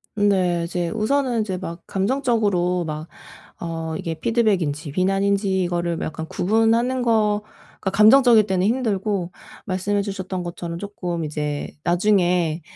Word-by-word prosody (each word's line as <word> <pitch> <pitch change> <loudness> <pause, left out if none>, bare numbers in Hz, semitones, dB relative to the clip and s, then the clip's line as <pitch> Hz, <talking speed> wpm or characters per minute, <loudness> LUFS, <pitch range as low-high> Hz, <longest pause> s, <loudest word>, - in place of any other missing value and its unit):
네. 185 -4 +2
이제 175 0 -2
우선은 240 +3 0
이제 190 -4 -3
막 170 -2 -7
감정적으로 200 -5 +1
막 155 +1 -5 0.5
어 165 -1 -4
이게 165 - -3
피드백인지 180 -9 0
비난인지 195 +2 +1
이거를 175 -1 -1
약간 160 +1 -4
구분하는 225 +7 +1
거가 210 -4 -1
감정적일 220 +1 +6
때는 190 -2 0
힘들고 205 -6 -1 0.3
말씀해 200 +1 -1
주셨던 190 -2 -4
것처럼 170 -1 -6
쪼끔 180 -4 -4
이제 150 -1 -3
나중에 175 -3 +2
190 Hz, 295 characters per minute, -22 LUFS, 170-215 Hz, 0.5 s, 감정적일